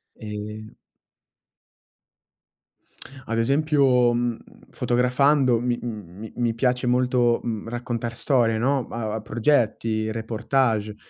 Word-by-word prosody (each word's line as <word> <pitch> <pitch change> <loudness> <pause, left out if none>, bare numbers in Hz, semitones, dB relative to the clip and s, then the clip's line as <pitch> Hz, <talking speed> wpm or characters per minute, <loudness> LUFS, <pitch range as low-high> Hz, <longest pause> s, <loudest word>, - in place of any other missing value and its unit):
Ehm 105 0 -7 2.5
Ad 115 - -2
esempio, 135 -1 +3
mhmm, 120 -1 -1 0.3
fotografando 125 +1 +2
mi 120 0 -1
mi 105 -2 -8
mi 120 -2 0
piace 125 +1 0
molto, 125 -1 +2
mhmm, 115 -1 -4
raccontar 120 -1 -4
storie, 120 -4 +2
no, 130 +2 0
a 110 -2 -4
a 110 - -4
progetti, 110 -2 0
reportage. 110 -1 -1
120 Hz, 95 wpm, -24 LUFS, 110-125 Hz, 2.5 s, esempio